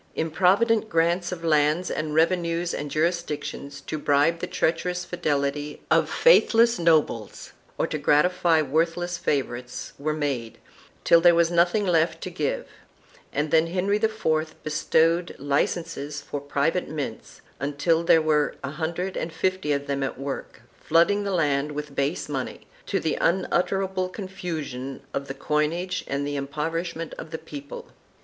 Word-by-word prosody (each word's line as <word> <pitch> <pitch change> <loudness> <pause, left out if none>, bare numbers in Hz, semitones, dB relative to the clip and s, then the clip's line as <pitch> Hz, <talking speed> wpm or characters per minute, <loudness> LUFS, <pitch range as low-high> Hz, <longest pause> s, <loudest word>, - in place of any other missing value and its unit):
Improvident 195 +8 +2
grants 170 +2 +1
of 175 -2 -6
lands 155 +2 +2
and 155 -1 -2
revenues 170 +1 +1
and 145 - -4
jurisdictions, 155 -3 -2
to 155 - -5
bribe 145 +4 +2
the - - -3
treacherous 180 +2 -1
fidelity 145 -3 -2
of - - +4
faithless 235 - +5
nobles, 155 -10 +1 0.3
or - - +1
to 155 - -3
gratify 160 +2 +3
worthless 165 +4 0
favorites, 125 -6 -3
were 155 +2 -1
made, 135 -7 -3 0.5
till 170 - +6
there 175 0 +6
was 170 0 +3
nothing 175 +5 +3
left 165 -2 +2
to 185 - -5
give, 155 -5 -2 0.7
and 145 +1 -1
then 160 0 +4
Henry 190 +4 +1
IV 160 -8 0
bestowed 165 +3 +1
licenses 145 +1 -1
for 145 0 -6
private 145 +5 0
mints, 145 -7 -6 0.2
until 145 +4 +1
there 165 -1 +5
were 150 -1 +2
a 140 - -3
hundred 170 +4 -3
and 160 - -3
fifty 185 -1 -1
of 140 0 0
them 140 -1 -2
at 135 - -2
work, 135 0 -6 0.2
flooding 170 +6 +3
the - - -1
land 150 -4 +1
with 150 -1 -6
base 140 +5 -1
money, 135 -3 -4 0.3
to - - 0
the - - -1
unutterable 185 +1 +1
confusion 160 - -6
of 140 0 -3
the 135 - -5
coinage 165 +5 -1
and 140 0 -2
the 145 0 -3
impoverishment 165 +4 -3
of - - -7
the 160 - -4
people. 145 -3 -9
160 Hz, 145 wpm, -25 LUFS, 145-175 Hz, 0.7 s, till